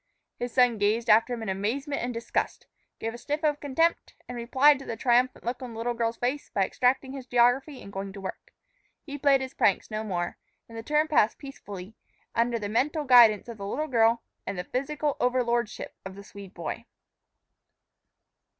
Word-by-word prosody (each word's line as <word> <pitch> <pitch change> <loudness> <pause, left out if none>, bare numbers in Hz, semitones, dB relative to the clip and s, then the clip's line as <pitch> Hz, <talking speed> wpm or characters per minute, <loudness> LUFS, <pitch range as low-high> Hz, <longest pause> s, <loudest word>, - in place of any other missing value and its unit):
His 245 0 -3
son 245 -3 +3
gazed 215 +3 +2
after 225 +3 +5
him 235 -2 -3
in 220 - -4
amazement 245 +10 -2
and 245 - -2
disgust, 230 0 -3 0.3
gave 225 0 -4
a 240 - -9
sniff 295 +5 -3
of 295 -1 +1
contempt, 325 +4 0
and 250 - -6
replied 260 +4 +4
to 275 - -10
the 225 - -5
triumphant 245 +2 +2
look 245 +2 -3
on 250 -2 -7
the - - -9
little 240 +2 -1
girl's 230 0 -1
face 260 +4 -2
by 195 -2 +1
extracting 260 +5 +1
his 265 -2 -8
geography 250 +4 +2
and 200 - -11
going 195 0 -4
to 195 - -9
work. 190 - -7 0.5
He 285 -2 -7
played 275 -1 +4
his 260 0 -5
pranks 200 0 +1
no 215 0 -2
more, 175 -5 -3 0.3
and 230 - -13
the 225 - -5
term 300 +6 +1
passed 235 -8 +3
peaceably, 205 -8 -9 0.4
under 235 0 +1
the 210 -2 -4
mental 275 +9 0
guidance 240 -6 +6
of 230 -3 -8
the 200 - -5
little 300 +9 -2
girl 230 -4 +3 0.2
and 195 - -3
the 180 - -2
physical 290 +5 -2
overlordship 240 -2 0
of 190 0 -8
the 200 - -10
Swede 200 -1 -12
boy. 170 -2 -5
240 Hz, 195 wpm, -27 LUFS, 215-270 Hz, 0.5 s, guidance